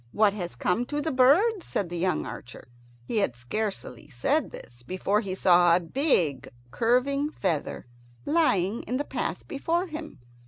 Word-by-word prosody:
"What 210 Hz, -1 st, +4 dB
has 175 Hz, -, -5 dB
come 205 Hz, -, 0 dB
to 295 Hz, +1 st, -2 dB
the 315 Hz, +2 st, -1 dB
birds?" 340 Hz, -, +4 dB
said 190 Hz, -4 st, -2 dB
the 175 Hz, -, -3 dB
young 185 Hz, +1 st, 0 dB
archer. 120 Hz, 0 st, -9 dB, 0.4 s
He 220 Hz, -, -3 dB
had 195 Hz, -, +1 dB
scarcely 125 Hz, -, -5 dB
said 255 Hz, -, 0 dB
this 120 Hz, 0 st, -12 dB
before 185 Hz, -, 0 dB
he 190 Hz, -4 st, -4 dB
saw 175 Hz, -2 st, +5 dB
a -, -, +3 dB
big 170 Hz, -, 0 dB, 0.2 s
curving 260 Hz, -, +1 dB
feather 180 Hz, -, -2 dB, 0.4 s
lying 225 Hz, -, +2 dB
in 250 Hz, -, -1 dB
the 290 Hz, -, -2 dB
path -, -, -4 dB
before 335 Hz, +5 st, -1 dB
him. 315 Hz, -2 st, -8 dB
210 Hz, 160 wpm, -27 LUFS, 175-285 Hz, 0.4 s, saw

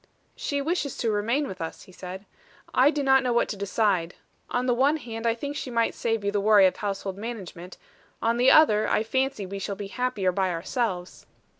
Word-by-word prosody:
"She 285 Hz, -1 st, -2 dB
wishes 310 Hz, -3 st, -2 dB
to 230 Hz, -, 0 dB
remain 230 Hz, +8 st, 0 dB
with 185 Hz, -6 st, -8 dB
us," 160 Hz, -, -6 dB
he -, -, -16 dB
said. 185 Hz, +2 st, -8 dB, 0.5 s
"I 260 Hz, +3 st, +5 dB
do 295 Hz, -2 st, -1 dB
not 265 Hz, 0 st, +5 dB
know 250 Hz, -2 st, -1 dB
what 235 Hz, -, +2 dB
to -, -, -3 dB
decide. 200 Hz, -3 st, 0 dB, 0.3 s
On 250 Hz, +1 st, -1 dB
the 250 Hz, -, +2 dB
one 275 Hz, +6 st, +3 dB
hand 230 Hz, -4 st, -5 dB
I 230 Hz, -, +2 dB
think 285 Hz, +4 st, -5 dB
she 270 Hz, -, -4 dB
might 230 Hz, -2 st, +1 dB
save 225 Hz, -2 st, -1 dB
you 200 Hz, -, +1 dB
the 205 Hz, -1 st, 0 dB
worry 205 Hz, -1 st, +6 dB
of 185 Hz, -, +2 dB
household 195 Hz, -1 st, -4 dB
management; 190 Hz, -6 st, -7 dB, 0.4 s
on 230 Hz, +1 st, +1 dB
the 250 Hz, +2 st, +5 dB
other, 220 Hz, -9 st, +5 dB
I 215 Hz, -, +2 dB
fancy 260 Hz, -2 st, -1 dB
we 195 Hz, +1 st, -6 dB
shall 200 Hz, 0 st, -4 dB
be 195 Hz, 0 st, -7 dB
happier 230 Hz, -6 st, -1 dB
by 190 Hz, +1 st, 0 dB
ourselves." 180 Hz, +1 st, -3 dB
225 Hz, 210 wpm, -26 LUFS, 195-255 Hz, 0.5 s, worry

